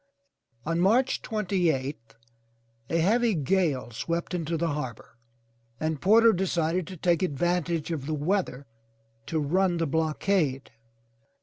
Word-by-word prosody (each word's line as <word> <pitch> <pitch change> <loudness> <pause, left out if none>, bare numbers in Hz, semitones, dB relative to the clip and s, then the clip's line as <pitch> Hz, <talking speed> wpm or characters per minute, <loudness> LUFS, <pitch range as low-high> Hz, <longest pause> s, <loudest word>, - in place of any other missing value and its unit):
On 165 +2 0
March 235 +9 +3
twenty 195 -5 0
eighth, 130 -5 -4 0.7
a 165 - +1
heavy 220 +6 +2
gale 155 -5 0
swept 170 +10 -3
into 165 -1 -2
the 170 +1 0
harbor 120 -5 -6 0.6
and 155 -2 -2
Porter 225 +3 +6
decided 175 -2 0
to 185 - -8
take 170 0 +1
advantage 175 0 -1
of 145 -4 -4
the 155 - -1
weather 150 -3 -1 0.6
to 160 - -1
run 175 +4 +1
the 165 - 0
blockade. 155 -2 0
165 Hz, 125 wpm, -27 LUFS, 150-185 Hz, 0.7 s, Porter